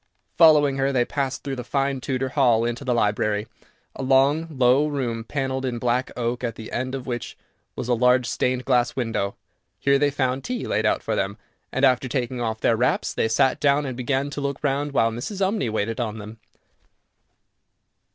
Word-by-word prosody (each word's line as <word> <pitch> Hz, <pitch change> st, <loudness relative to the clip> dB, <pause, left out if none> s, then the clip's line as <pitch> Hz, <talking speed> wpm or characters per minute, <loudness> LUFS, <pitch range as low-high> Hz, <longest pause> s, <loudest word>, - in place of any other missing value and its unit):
Following 150 Hz, -4 st, +5 dB
her, 135 Hz, 0 st, +1 dB
they 125 Hz, -3 st, +2 dB
passed 135 Hz, -1 st, -3 dB
through 135 Hz, -2 st, -4 dB
the 125 Hz, -, -4 dB
fine 135 Hz, +1 st, -1 dB
Tudor 130 Hz, 0 st, -2 dB
hall 120 Hz, -5 st, +3 dB
into 120 Hz, +3 st, -3 dB
the 125 Hz, -3 st, 0 dB
library, 105 Hz, -1 st, +1 dB, 0.5 s
a -, -, -6 dB
long, 135 Hz, +5 st, +3 dB
low 135 Hz, 0 st, +3 dB
room, 125 Hz, -6 st, -2 dB
panelled 130 Hz, +1 st, -3 dB
in 125 Hz, -2 st, -2 dB
black 125 Hz, +2 st, 0 dB
oak, 120 Hz, +1 st, -2 dB
at 120 Hz, -2 st, -2 dB
the 110 Hz, -, -9 dB
end 130 Hz, +2 st, -2 dB
of 130 Hz, -2 st, -6 dB
which 120 Hz, -2 st, -5 dB, 0.4 s
was -, -, -4 dB
a 125 Hz, -, +2 dB
large 125 Hz, +1 st, +3 dB
stained 125 Hz, +1 st, -1 dB
glass 125 Hz, -2 st, +2 dB
window. 115 Hz, -5 st, -2 dB, 0.4 s
Here 140 Hz, 0 st, +2 dB
they 145 Hz, 0 st, +3 dB
found 130 Hz, -1 st, -1 dB
tea 250 Hz, -1 st, -3 dB
laid -, -, 0 dB
out -, -, 0 dB
for -, -, -1 dB
them, 100 Hz, +2 st, -2 dB, 0.3 s
and, 135 Hz, +1 st, +2 dB
after 130 Hz, 0 st, +2 dB
taking 125 Hz, -1 st, -2 dB
off 110 Hz, -1 st, -2 dB
their 115 Hz, -, +3 dB
wraps, 125 Hz, +3 st, 0 dB
they -, -, +1 dB
sat 120 Hz, +3 st, +2 dB
down 145 Hz, +1 st, +2 dB
and 130 Hz, -2 st, -4 dB
began 135 Hz, +3 st, -1 dB
to 145 Hz, -, -5 dB
look 140 Hz, 0 st, -3 dB
round, 145 Hz, +1 st, 0 dB
while 115 Hz, -4 st, +2 dB
Mrs. 120 Hz, -, -5 dB
Umney 195 Hz, -, 0 dB
waited 110 Hz, +1 st, -2 dB
on 110 Hz, -3 st, -2 dB
them. 110 Hz, +1 st, -9 dB
130 Hz, 195 wpm, -23 LUFS, 120-140 Hz, 0.5 s, Following